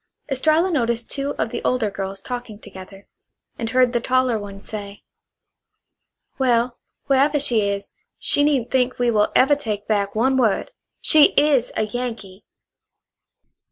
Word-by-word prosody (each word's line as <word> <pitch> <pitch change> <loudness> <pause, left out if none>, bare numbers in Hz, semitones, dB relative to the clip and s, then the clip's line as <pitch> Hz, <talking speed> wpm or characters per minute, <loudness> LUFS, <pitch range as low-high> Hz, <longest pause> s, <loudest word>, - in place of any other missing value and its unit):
Estralla 315 +7 +2
noticed 235 -6 -1
two 280 0 -2
of 220 +1 -2
the - - -5
older 235 -5 0
girls 195 0 -6
talking 245 -3 -7
together, 195 -1 -13 0.5
and 225 -1 -3
heard 250 +1 +2
the 240 - +1
taller 255 -2 +1
one 200 -1 -9
say: 200 -1 -8 1.4
"Well, 245 -1 +1 0.3
wherever 285 +2 +2
she 245 -6 +2
is, 200 0 -5 0.2
she 285 - +2
needn't 275 -5 +1
think 255 -1 +1
we 245 -1 +1
will 210 -2 +2
ever 280 +3 +5
take 210 -7 -5
back 200 -2 -1
one 260 +4 +2
word. 235 - +1 0.3
She 305 -1 +6
IS 285 -4 +2
a 220 - +1
Yankee!" 215 -4 -6
240 Hz, 145 wpm, -21 LUFS, 210-265 Hz, 1.4 s, She